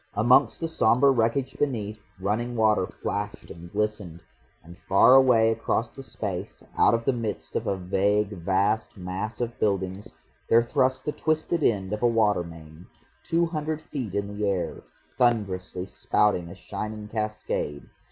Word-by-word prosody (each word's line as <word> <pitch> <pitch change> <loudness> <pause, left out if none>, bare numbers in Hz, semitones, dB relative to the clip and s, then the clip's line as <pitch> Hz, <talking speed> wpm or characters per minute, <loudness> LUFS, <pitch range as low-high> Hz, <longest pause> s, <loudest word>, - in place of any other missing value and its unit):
Amongst 115 +5 +4
the 165 - -2
sombre 135 -3 +4
wreckage 125 +2 0
beneath, 110 -7 -2 0.2
running 110 +5 -1
water 110 -4 +3
flashed - - -5
and 85 +1 -11
glistened, 105 -5 -3 0.4
and 85 +2 -13
far 95 +6 +5
away 125 -4 +6
across 115 +1 -1
the 135 - -10
space, 105 -7 -6
out - - +5
of 115 0 -3
the 135 - +3
midst 115 -3 -5
of - - -1
a 100 - 0
vague 100 +3 +1
vast 100 +5 0
mass 95 +4 -5
of 120 -1 -4
buildings, 100 +1 -1 0.4
there 115 +1 +6
thrust 130 +1 0
the 150 - 0
twisted 155 +2 -1
end 100 -6 +1
of 105 - -3
a 120 - +4
water 110 -5 +2
main, 80 0 -12 0.3
two 170 +1 +1
hundred 155 -2 -3
feet 130 - -6
in 100 0 -3
the 105 -1 0
air, 95 -3 -2 0.4
thunderously 95 -7 0
spouting 95 -3 0
a - - -9
shining 105 0 -6
cascade. 105 -9 -3
105 Hz, 155 wpm, -26 LUFS, 95-120 Hz, 0.4 s, away